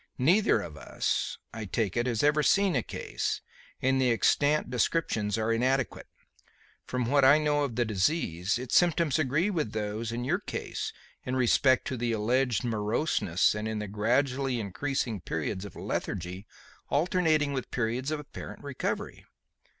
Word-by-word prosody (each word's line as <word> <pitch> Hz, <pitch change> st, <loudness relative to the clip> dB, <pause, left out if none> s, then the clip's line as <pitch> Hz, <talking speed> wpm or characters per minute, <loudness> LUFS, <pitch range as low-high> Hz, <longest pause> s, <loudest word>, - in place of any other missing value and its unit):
Neither 165 Hz, -, +4 dB
of 80 Hz, -5 st, -8 dB
us, -, -, -2 dB, 0.2 s
I 110 Hz, -1 st, -5 dB
take 100 Hz, -1 st, -1 dB
it, 120 Hz, +1 st, +1 dB
has 115 Hz, -1 st, 0 dB
ever 150 Hz, +1 st, +4 dB
seen 195 Hz, +3 st, +3 dB
a 125 Hz, -, +2 dB
case, -, -, -3 dB, 0.4 s
and 130 Hz, 0 st, +3 dB
the 130 Hz, -, +3 dB
extant 145 Hz, +6 st, +2 dB
descriptions 115 Hz, -5 st, 0 dB
are 110 Hz, +1 st, +1 dB
inadequate. 130 Hz, +2 st, 0 dB, 0.8 s
From 125 Hz, -1 st, -1 dB
what 140 Hz, +3 st, +3 dB
I 140 Hz, +3 st, +8 dB
know 150 Hz, -1 st, +1 dB
of 130 Hz, -5 st, -3 dB
the 120 Hz, 0 st, +1 dB
disease, 100 Hz, -, 0 dB
its 125 Hz, 0 st, -3 dB
symptoms 170 Hz, -3 st, +3 dB
agree 155 Hz, +8 st, +1 dB
with 155 Hz, -, -2 dB
those 110 Hz, +1 st, -3 dB
in 120 Hz, +1 st, -3 dB
your 175 Hz, +8 st, +1 dB
case -, -, -4 dB, 0.3 s
in 130 Hz, -, -2 dB
respect 130 Hz, +1 st, +3 dB
of 130 Hz, -, -3 dB
the 120 Hz, -1 st, 0 dB
alleged 120 Hz, +3 st, +1 dB
moroseness 110 Hz, -, +1 dB
and 105 Hz, +1 st, -3 dB
in 110 Hz, 0 st, -2 dB
the 105 Hz, 0 st, -4 dB
gradually 125 Hz, +5 st, 0 dB
increasing 115 Hz, +1 st, -2 dB
periods 90 Hz, +5 st, -3 dB
of 100 Hz, -, -10 dB
lethargy 95 Hz, +2 st, -4 dB, 0.4 s
alternating 155 Hz, -2 st, +2 dB
with 130 Hz, -2 st, -3 dB
periods 120 Hz, +3 st, -1 dB
of 155 Hz, -1 st, -2 dB
apparent 145 Hz, -, -9 dB
recovery. 140 Hz, -2 st, -4 dB
125 Hz, 160 wpm, -29 LUFS, 110-145 Hz, 0.8 s, I